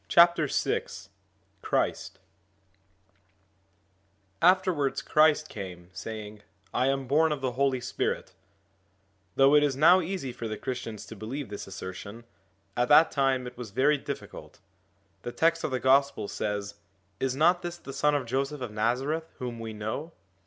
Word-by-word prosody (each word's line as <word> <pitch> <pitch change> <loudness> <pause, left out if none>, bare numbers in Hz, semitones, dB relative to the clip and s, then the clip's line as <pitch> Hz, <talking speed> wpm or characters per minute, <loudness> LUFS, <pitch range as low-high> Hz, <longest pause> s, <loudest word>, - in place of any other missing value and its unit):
VI 170 -3 +6 1.1
CHRIST - - -1 2.2
AFTERWARDS 180 -6 +3
Christ 155 0 +4
came 90 - -8
saying, 105 +2 -7 0.3
'I 130 - +2
am 135 0 0
born 155 +4 +3
of 150 -3 -2
the 130 -2 -1
Holy 135 +1 +1
Spirit/ 120 - -3 1.0
Though 135 +1 +5
it 150 - +7
is 145 -2 +1
now 170 +6 +6
easy 165 -7 -4
for 115 -1 -5
the 110 -1 -4
Christians 115 -4 -5
to 110 - -10
believe 115 +4 -6
this 100 -1 -7
assertion, 95 +4 -8 0.5
at 120 0 +1
that 155 +2 +7
time 135 -2 +1
it 125 0 -8
was 120 -3 -6
very 140 +7 +2
difficult. - - -8 0.6
The 120 - -5
text 165 +5 +2
of - - 0
the 130 -1 -1
Gospel 135 -5 +3
says, 105 -1 -3 0.5
'Is 130 -1 -1
not 175 +5 +4
this 175 0 -5
the 135 -5 -9
son 150 +1 +2
of 140 -3 -1
Joseph 135 +4 -2
of 125 -4 -4
Nazareth 130 +9 -1
whom 120 -2 -5
we 115 -1 -5
know 110 +10 -5
135 Hz, 145 wpm, -28 LUFS, 110-150 Hz, 2.2 s, it